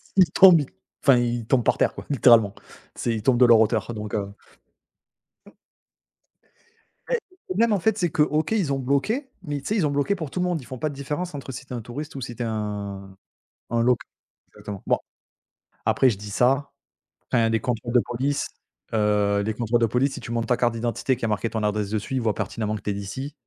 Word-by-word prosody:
ils 185 -2 +5
tombent, 175 -6 +7 0.4
enfin 135 -3 +6
ils 120 -1 -1
tombent 125 0 +2
par - - +3
terre - - +2
quoi, - - -9
littéralement. 115 -6 +5 0.4
C'est 115 - -1
ils 110 - -3
tombent 125 0 +3
de 125 - +8
leur 115 -2 +7
hauteur 110 +1 +1
donc, 105 -2 -6
heu 100 0 -3 2.8
Et - - +3 0.3
mais 185 - -3
même, 230 0 +4
en 200 - +2
fait, 220 +4 +1
c'est 175 -5 +1
que 150 - 0
OK, 155 +2 +1
ils 190 -11 +1
ont 135 - -1
bloqué, 200 - 0
mais 145 -1 -3
tu - - -8
sais, 215 - 0
ils 185 -8 +2
ont 145 - +1
bloqué 145 +8 +1
pour 160 -7 -6
tout 180 - -3
le 180 - +1
monde, 175 -5 -1
ils - - -13
font 130 - -7
pas 155 - -1
de 140 - -8
différence 150 +4 -4
entre 140 -1 -6
si 130 +2 -8
tu 135 - -9
es - - -2
un 120 - -4
touriste 140 +8 -7
ou 135 - -5
si 120 -1 -6
tu 120 - -4
es - - -2
un 100 -3 -4 0.6
un 115 - +2
loc 125 0 +4 0.6
attends, 100 -2 -7
bon, - - +3 0.9
après 130 - +4
je 105 - -2
dis 105 +1 -8
ça, 135 +6 +2 0.6
enfin, 115 -3 +3
les 115 - +1
contrôles 120 -1 -3
de 125 - +6
police, 135 +4 -1 0.4
heu, 105 -2 +2
les 110 - -1
contrôles 120 +1 0
de 115 - +4
police, 130 +5 +1
si - - -6
tu 115 - -7
montres 115 -1 -1
ta 125 - +3
carte 120 -1 +1
d'identité, 120 +3 -1
qu'il - - -17
y - - +1
a - - -2
marqué 105 +2 -1
ton 110 - -2
adresse 105 -1 0
dessus, 110 +4 -3
ils - - +1
voient 110 -3 0
pertinemment 105 +1 -3
que - - -7
tu - - -2
es 100 - -1
d'ici 130 +9 -6
120 Hz, 235 wpm, -24 LUFS, 110-145 Hz, 2.8 s, de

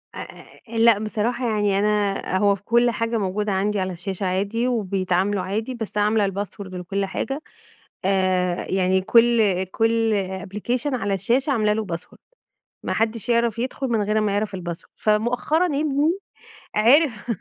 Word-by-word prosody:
آآ - - -9 0.2
أ 230 - -5
لأ، 225 -2 +5
بصراحة 230 +3 -1
يعني 205 -2 +1
أنا 205 -2 0
هو 200 0 +3
في 195 - -16
كُلّ 240 +2 +3
حاجة 230 0 -1
موجودة 205 +1 -1
عندي، 200 +2 0
على 185 -1 -2
الشاشة 190 +2 -4
عادي 200 +6 0
وبيتعاملوا 195 -3 0
عادي، 220 +7 -3
بس 220 -2 -6
عاملة 210 0 +2
الpassword 200 +1 -5
لكُل 195 +2 -2
حاجة، 270 +9 -4 0.6
آآ 185 -2 +1
يعني 190 0 +2
كُل 220 -3 +3
كُل 225 +3 +1 0.3
application 240 +7 -2
على 200 -5 -1
الشاشة 240 - +1
عاملة 215 -5 +2
لُه 215 -1 -2
password 170 - -15 0.7
ما - - -2
حدّش 225 0 -1
يعرف 235 -1 +2
يدخُل، 260 +2 -2
من 225 -3 +1
غير 215 +1 +1
أمّا 210 -2 +1
يعرف 205 -1 -1
الpassword 175 -1 -7
فمؤخرًا 245 +10 +1
ابني، 300 +3 +1 0.6
عرف 240 0 +3
210 Hz, 150 wpm, -23 LUFS, 195-235 Hz, 0.7 s, لأ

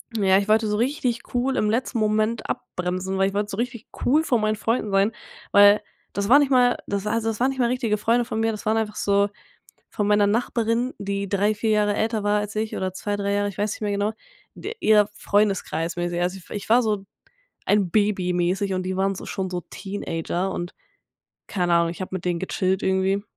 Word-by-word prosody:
Ja, 190 -3 +4
ich 200 +1 0
wollte 220 0 +3
so 210 - 0
richtig 250 -1 -1
cool 255 +2 0
im 210 - +2
letzten 235 +1 -1
Moment 215 +1 0
abbremsen, 185 +1 -3
weil 195 0 +3
ich 195 - -4
wollte 205 +1 -1
so 195 - -5
richtig 235 -1 -4 0.2
cool 305 +5 +4
vor 245 -7 +1
meinen 215 0 +1
Freunden 225 0 -1
sein, 195 +2 +3 0.4
weil 205 +1 +7 0.3
das 200 +1 -2
war 280 +4 +8
nicht 285 -2 +2
mal 250 -2 +4
das 200 0 -2
also, 225 +1 -1
das 220 -2 -2
waren 260 - +4
nicht 265 -1 -5
mal 240 - +3
richtige 235 -4 0
Freunde 235 +3 +2
von 230 -2 -4
mir, 225 0 +1
das 215 - -7
waren 220 +1 +2
einfach 215 -1 -2
so, 200 0 +2 0.6
von 205 - -2
meiner 205 0 +4
Nachbarin, 230 +3 0
die 200 0 -3
3, 205 +2 +2
4 215 +1 -2
Jahre 210 -1 +2
älter 220 0 -1
war 205 0 +2
als 210 +1 -5
ich 215 0 -2
oder 185 -1 -2
2, 205 +2 -3
3 200 0 -1
Jahre, 205 0 +1
ich 190 - -11
weiß 210 +1 0
nicht - - -11
mehr 210 -1 -1
genau, 205 +2 0 0.4
de 425 - -6
ihr 210 -1 +5
Freundeskreis-mäßig. 175 -5 0
Also 180 +2 -1
ich 185 - -16
w - - -7
ich 205 - -6
war 240 +2 +6
so 210 -4 -1 0.6
ein 200 -4 +2
Baby-mäßig 190 -2 +1
und 185 0 -1
die 185 0 -3
waren 195 +1 +1
so - - -8
schon 190 -2 -3
so 180 -1 -3
Teenager 190 -1 -3
und- 175 -1 -5 0.7
keine 180 -3 -1
Ahnung- 170 0 +3
ich 175 +2 -6
hab - - -6
mit 185 -2 -4
denen 175 -2 -1
gechillt 190 0 -1
irgendwie 190 +1 +1
205 Hz, 220 wpm, -24 LUFS, 190-225 Hz, 0.7 s, war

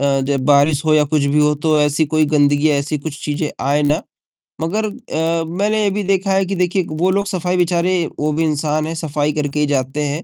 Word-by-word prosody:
अ, 140 -1 +1
जब 135 -1 -1
बारिश 145 +1 +3
हो 155 - +3
या 150 -1 +4
कुछ 150 0 0
भी 140 +2 +1
हो, 150 0 +3
तो 155 +1 +1
ऐसी 150 +2 +2
कोई 155 +1 +2
गंदगी 145 +1 +3
या - - +2
ऐसी 145 +2 -2
कुछ 150 0 -7
चीज़ें 150 +1 -2 0.2
आए 145 +2 +2
ना, 145 +1 +1 0.6
मगर 210 +7 -1
अ, 165 -7 -2
मैंने 205 +5 0
ये 200 - +2
भी 205 +1 -2
देखा 195 0 0
है 190 0 +2
कि 195 - -3
देखिए 180 0 0
वो 160 +4 0
लोग 200 +1 0
सफ़ाई 180 -2 -1
बेचारे 175 +1 +1 0.3
वो 150 +1 0
भी 160 +2 0
इंसान 155 0 -1
हैं, 165 - -4
सफ़ाई 150 -2 -1
करके 150 -1 -2
ही 150 - +3
जाते 140 +1 -1
हैं 145 +4 -3
155 Hz, 235 wpm, -18 LUFS, 145-180 Hz, 0.6 s, या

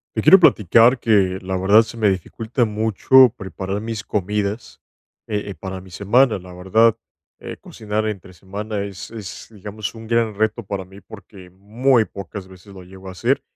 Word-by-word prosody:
Te - - 0
quiero 190 - +7
platicar 115 - +4
que, 95 -4 +2
la 95 0 -3
verdad, 100 +4 +5
se 115 +1 -8
me 110 -2 +2
dificulta 110 - -1
mucho 110 +4 +4
preparar 95 +1 -5
mis 110 -2 -5
comidas, 105 +2 -3 0.5
eh 105 -1 -2
eh, 100 - -7
para 95 -1 -7
mi 95 - -15
semana. 105 +6 +2
La 90 -1 -12
verdad, 105 +5 +2 0.4
eh, - - -8
cocinar 110 0 -4
entre 100 -3 -6
semana 100 +3 -5
es 100 -1 -8
es, 95 -9 -9
digamos, 105 0 -7
un 115 0 -10
gran 115 -2 0
reto 110 +2 0
para 100 -2 -5
mí, 95 +2 -15
porque 100 -4 -14
muy 110 +6 +1
pocas 100 -1 -9
veces 95 +2 -15
lo 95 - -11
llego 95 +1 -13
a - - -6
hacer, 90 - 0
105 Hz, 175 wpm, -20 LUFS, 95-110 Hz, 0.5 s, quiero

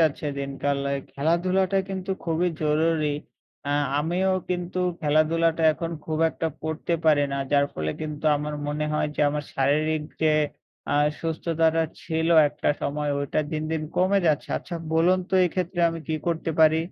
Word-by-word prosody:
যাচ্ছে 155 -1 +1
দিনকাল। 140 0 -2
এ্যা 140 - 0
খেলাধুলাটা 185 +6 +1
কিন্তু 190 0 -4
খুবই 170 +2 +1
জরুরি 155 +1 +2 0.6
আ - - -1 0.3
আমিও 175 +5 +1 0.2
কিন্তু 180 0 -2 0.2
খেলাধুলাটা 160 +2 +2
এখন 165 +1 -4
খুব 155 -1 -2
একটা 165 - -3 0.2
করতে 160 +2 -1
পারি 150 -2 +5
না। - - -1 0.2
যার 140 0 +5
ফলে 80 0 -2
কিন্তু 150 -1 -5
আমার 150 +1 -4
মনে 150 +1 -1
হয় 150 - +1
যে, - - -1
আমার 150 0 -3
শারীরিক 150 +3 +1 0.2
যে 155 - +5 0.6
আ - - +1 0.3
সুস্থতাটা 165 0 +1 0.2
ছিল 160 0 -1 0.2
একটা 150 - -3
সময় 150 +1 -1
ওইটা 140 +1 -1
দিন, 155 0 -1
দিন, 160 -1 -1
কমে 190 +2 +3
যাচ্ছে। 150 -3 +1
আচ্ছা 175 - -8 0.2
বলুন 175 +3 +4
তো - - 0
এক্ষেত্রে 180 0 -2
আমি 165 - -5
কী 160 - 0
করতে 165 -1 -1
পারি? 160 0 +6
160 Hz, 160 wpm, -25 LUFS, 150-170 Hz, 0.6 s, পারি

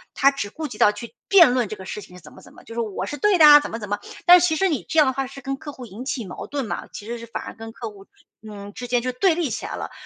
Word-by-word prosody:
他 275 0 +5
只 275 -7 -5
顾 310 +8 -6
及 230 -6 -11
到 210 - +6
去 210 +3 -10
辩 345 -10 +7
论 250 -3 +1
这 - - -5
个 190 - -11
事 210 - -6
情 180 -2 -14
是 - - -14
怎 150 - -14
么 - - -15
怎 - - -17
么。 - - -17
就 230 - -11
是 235 - -2
“我 205 -4 -4
是 290 - -5
对 415 0 +3
的 320 - +8
啊”， 295 0 +10
怎 - - -6
么 225 - -5
怎 210 -3 -7
么。 205 0 -1 0.3
但 355 +1 +9
其 340 -2 +2
实 385 +4 +2
你 300 - -2
这 - - -3
样 305 - +7
的 260 - 0
话 270 0 -3
是 275 +1 -11
跟 270 +1 -4
客 290 +2 -9
户 255 -3 -10
引 225 +2 -9
起 260 -3 -4
矛 180 - -8
盾 280 -3 -3
嘛， - - -5
其 205 - -9
实 235 +1 -5
是 230 - -10
反 230 - -6
而 - - -8
跟 225 0 -9
客 225 -1 -7
户 195 -1 -16 0.3
嗯， 205 -2 -10
之 245 +3 -7
间 245 -1 0
就 255 - -1
对 330 +7 +2
立 325 -7 -1
起 - - -4
来 - - -5
了。 - - -6
245 Hz, 370 characters per minute, -22 LUFS, 210-290 Hz, 0.3 s, 啊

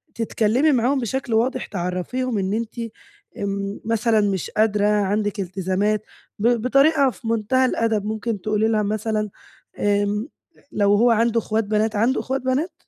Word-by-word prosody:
تتكلّمي 230 +5 +2
معاهم 260 +1 +2
بشكل 245 0 -3
واضح 250 +3 +1
تعرّفيهُم 200 +6 -3
إن 195 0 -1
أنتِ 230 +1 -4 0.6
آمم، 200 0 -3
مثلًا 225 -1 +2
مش 195 -4 -1
قادرة، 210 -1 +2
عندِك 205 0 0
التزامات، 190 +3 -1 0.4
ب 215 - +2
بطريقة 275 +3 +4
في 230 - -10
مُنتهى 230 +4 +2
الأدب، 225 -4 0
ممكن 215 -1 -3
تقولي 215 +2 +1
ليها 215 -1 +1
مثلًا 215 0 -1 0.5
آمم 205 +2 0 0.4
لو 205 -1 +2
هو 235 +3 +4
عندُه 230 +1 +2
إخوات 220 0 -1
بنات، 215 +1 0
عندُه 230 +6 +2
إخوات 265 0 -2
بنات؟ 265 +7 -1
215 Hz, 145 wpm, -22 LUFS, 205-235 Hz, 0.6 s, بطريقة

